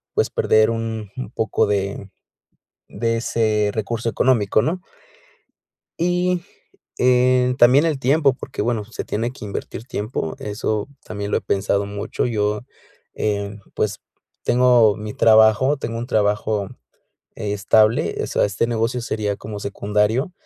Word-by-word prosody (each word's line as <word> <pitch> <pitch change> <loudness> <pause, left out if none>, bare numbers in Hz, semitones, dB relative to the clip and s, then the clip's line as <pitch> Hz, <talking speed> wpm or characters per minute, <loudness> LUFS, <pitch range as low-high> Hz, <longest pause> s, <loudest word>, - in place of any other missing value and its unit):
pues, - - +2
perder 110 +1 +3
un 115 -2 -4
un 130 -5 -5
poco 110 -2 0
de, 100 0 -2 0.8
de 115 0 -1
ese 110 -3 +1
recurso 115 +2 -2
económico, 110 -3 +2
¿no? 175 +8 -2 1.2
Y, 180 +1 +1 0.6
eh, 125 0 +3
también 130 +5 +6
el 155 -4 0
tiempo, 140 +2 +3
porque, 130 +1 -5
bueno, 115 -3 -1
se 115 - -7
tiene 115 +3 -2
que 130 - -10
invertir 105 +2 -6
tiempo, 105 -8 -4
eso 105 +2 -3 0.2
también 100 -1 -5
lo - - +2
he - - -9
pensado 100 0 0
mucho. 100 0 -3
Yo, 105 -2 0 0.5
eh, 100 -1 -2 0.2
pues, 105 -1 -1 0.4
tengo 120 -4 +4
mi 105 0 -6
trabajo, 110 +5 +5
tengo 115 -4 -4
un 120 - -4
trabajo 105 -2 0 0.7
estable, 105 +2 +2
eh, - - 0
o - - -4
sea, - - +1
este 100 +3 0
negocio 115 +1 -1
sería 105 -3 -2
como 105 0 -7
secundario. 105 - 0
110 Hz, 140 wpm, -21 LUFS, 105-125 Hz, 1.2 s, también